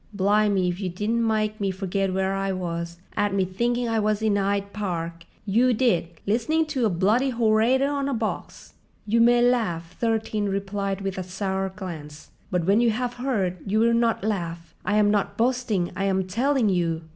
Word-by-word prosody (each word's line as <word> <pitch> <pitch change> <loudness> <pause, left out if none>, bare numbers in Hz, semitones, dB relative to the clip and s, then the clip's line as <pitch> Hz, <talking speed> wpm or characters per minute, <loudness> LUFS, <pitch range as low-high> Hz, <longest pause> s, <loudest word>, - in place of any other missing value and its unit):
"Bli'me 200 -1 +3
if 175 +1 -2
you 190 -3 -2
didn't 210 +6 -1
mike 215 -1 0
me 200 - +1
forget 190 0 -1
where 190 +1 0
I 195 0 -1
was—'ad 175 +2 -3
me 190 -1 +2
thinking 235 +6 -1
I 225 -1 +1
was 215 0 0
in 215 -2 +2
'Yde 200 0 -1
Park, 170 -5 -4 0.2
you 235 +4 +3
did, 215 -9 +2 0.2
listening 250 +10 +1
to 250 -5 +2
a - - +1
bloody 210 +9 +2
horator 235 +3 +3
on 280 -1 -1
a - - -1
box." 220 -1 -5 0.3
"You 230 +2 +2
may 240 +1 +5
laugh," 180 -9 0
Thirteen 220 -2 0
replied 195 0 -2
with 195 -1 -3
a - - -3
sour 190 +1 -2
glance; 165 -6 -9 0.2
"but 180 -3 0
when 200 +5 +4
you 240 - +4
have 245 +2 -1
heard, 200 -9 0
you 210 +2 0
will 235 +1 +4
not 230 -3 +1
laugh. 170 -6 -3
I 210 - 0
am 205 -1 +4
not 205 -2 0
boasting—I 225 -6 0
am 190 -1 +1
telling 240 +4 +1
you." 170 -3 0
205 Hz, 180 wpm, -25 LUFS, 185-230 Hz, 0.3 s, may